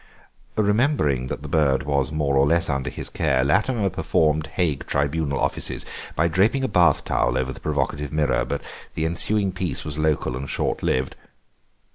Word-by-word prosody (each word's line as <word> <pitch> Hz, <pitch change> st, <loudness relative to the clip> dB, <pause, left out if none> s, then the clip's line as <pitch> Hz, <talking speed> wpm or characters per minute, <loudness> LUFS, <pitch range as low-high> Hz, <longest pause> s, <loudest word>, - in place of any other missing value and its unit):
Remembering 105 Hz, -, +2 dB
that -, -, -5 dB
the -, -, -6 dB
bird 70 Hz, -4 st, +2 dB
was 70 Hz, -2 st, 0 dB
more 75 Hz, -3 st, 0 dB
or 70 Hz, +1 st, +4 dB
less 85 Hz, 0 st, +2 dB
under 70 Hz, -1 st, -2 dB
his -, -, -6 dB
care 65 Hz, -1 st, +1 dB
Latimer 100 Hz, -, +1 dB
performed 75 Hz, -1 st, +1 dB
Hague 80 Hz, -6 st, -1 dB
Tribunal 70 Hz, 0 st, 0 dB
offices -, -, -2 dB, 0.3 s
by 80 Hz, -, +2 dB
draping 105 Hz, +11 st, +2 dB
a -, -, +2 dB
bath 85 Hz, -, +3 dB
towel -, -, +1 dB
over 65 Hz, 0 st, -1 dB
the -, -, -11 dB
provocative 75 Hz, -1 st, -2 dB
mirror, 75 Hz, -5 st, +1 dB
but 70 Hz, +3 st, -4 dB, 0.3 s
the 80 Hz, -, -1 dB
ensuing 95 Hz, +4 st, 0 dB
peace 90 Hz, -1 st, -3 dB
was 75 Hz, 0 st, -5 dB
local 75 Hz, -5 st, 0 dB
and 70 Hz, +1 st, -5 dB
short -, -, -1 dB
lived. 65 Hz, +1 st, 0 dB
75 Hz, 170 wpm, -23 LUFS, 70-90 Hz, 0.3 s, or